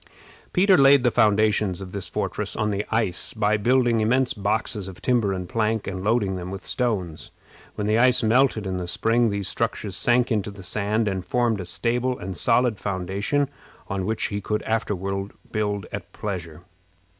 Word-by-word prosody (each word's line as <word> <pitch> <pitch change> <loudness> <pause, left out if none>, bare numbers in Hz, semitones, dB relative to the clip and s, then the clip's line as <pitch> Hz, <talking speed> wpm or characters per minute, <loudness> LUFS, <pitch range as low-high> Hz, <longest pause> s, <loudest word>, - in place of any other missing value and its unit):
Peter 190 +1 +4
laid 135 -1 +6
the 120 - +3
foundations 105 -3 +2
of 95 -2 -8
this 100 -2 -4
fortress - - -3
on 110 -1 0
the 100 0 -1
ice 110 -4 -1
by 105 -1 +2
building 120 +1 +2
immense 125 +4 +2
boxes 105 -1 -2
of 95 -2 -10
timber 120 -6 +1
and 90 -2 -4
plank, 110 +1 0
and 95 -1 -5
loading 105 -3 +1
them 90 0 -6
with 95 0 -7
stones. 100 -10 -2 0.5
When 105 - -3
the 110 +2 +2
ice 125 0 +5
melted 115 -1 +3
in 95 -1 -2
the 90 -1 -4
spring 115 +5 +2
these 100 -2 -1
structures 100 -3 -2
sank 125 +4 +2
into 105 -2 0
the 100 -2 -11
sand, 105 +3 0
and 95 -2 -2
formed 120 -2 0
a - - -6
stable 125 +7 0
and 95 0 -6
solid 120 +1 +2
foundation 100 +9 -1 0.4
on 95 -2 -2
which 110 0 -1
he 100 0 -3
could 105 +1 -2
afterward 100 -3 -2 0.2
build 105 -3 -1
at 95 -4 -7
pleasure. 85 -5 -6
105 Hz, 180 wpm, -24 LUFS, 95-115 Hz, 0.5 s, laid